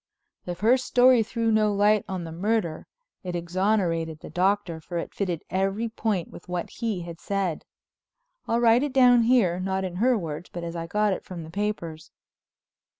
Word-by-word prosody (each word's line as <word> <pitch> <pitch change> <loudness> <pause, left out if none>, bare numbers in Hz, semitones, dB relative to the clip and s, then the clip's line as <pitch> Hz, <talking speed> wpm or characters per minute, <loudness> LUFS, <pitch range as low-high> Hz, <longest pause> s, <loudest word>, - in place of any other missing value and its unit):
If 175 +1 -5
her 235 +4 +5
story 250 -1 +4
threw 230 +1 -1
no 215 -1 +3
light 205 +1 +3
on 185 -2 -4
the 165 - -7
murder 180 -2 -1 0.4
it 180 -1 -4
exonerated 170 -2 0
the - - -10
Doctor, 185 -2 0
for 175 +2 -5
it 170 - -4
fitted 180 -5 -2
at - - -4
every 195 +4 0
point 215 -6 -2
with 175 - -13
what 180 -1 -3
he 220 -6 -3
had 170 -1 -8
said. 195 -5 -2 0.8
I'll 230 - +1
write 235 0 +5
it 285 -2 -2
down 250 -2 +6
here, 225 -7 +3
not 190 +1 -1
in 180 -2 -4
her 245 +4 +3
words, 165 -3 -6
but 175 - -6
as 170 0 -5
I 165 0 -4
got 210 +2 +1
it - - -5
from 175 -3 -8
the 160 - -10
papers. 170 -6 -4
195 Hz, 190 wpm, -26 LUFS, 175-220 Hz, 0.8 s, down